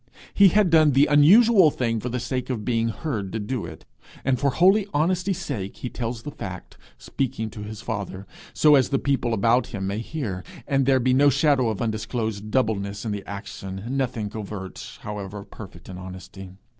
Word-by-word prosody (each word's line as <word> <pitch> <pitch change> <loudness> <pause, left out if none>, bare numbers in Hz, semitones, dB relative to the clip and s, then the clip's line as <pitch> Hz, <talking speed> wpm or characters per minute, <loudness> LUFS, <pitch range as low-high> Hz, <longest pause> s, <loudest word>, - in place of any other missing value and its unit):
He 200 - +7
had 200 -1 +3
done 155 -3 +5
the 135 +3 +5
unusual 185 +6 +6
thing 115 -5 -1
for 125 - -4
the 125 +1 -2
sake 125 +2 -3
of 115 -5 -3
being 115 -2 +1
heard 110 - -4
do 115 -6 -3
it, 80 -2 -11 0.4
and 130 -2 +2
for 140 - +2
holy 190 +8 +4
honesty 180 +5 +1
sake 115 - -4
he 125 - -6
tells 115 -1 -4
the 145 - -6
fact, - - -8 0.2
speaking 110 -5 -3
to 110 - -8
his 105 +1 -7
father 100 -4 -5 0.3
so 150 -1 +5
as 135 -3 +4
the 135 - +1
people 135 -4 0
about 115 +3 +2
him 100 -6 -5
may 100 +2 -2
hear, 115 - -4 0.2
and 135 -2 +1
there 135 -1 +4
be 130 +1 +2
no 140 +2 +5
shadow 140 -3 +3
of 110 -1 -2
undisclosed 110 -1 -3
doubleness 100 -4 -1
in 110 - -2
the 100 -1 -4
action 100 -1 -7
nothing 125 -6 -2
covert, 100 -3 -7
however 105 -1 -6
perfect 95 -4 -12
in 90 -1 -8
honesty. 95 +1 -9
115 Hz, 185 wpm, -24 LUFS, 105-140 Hz, 0.4 s, He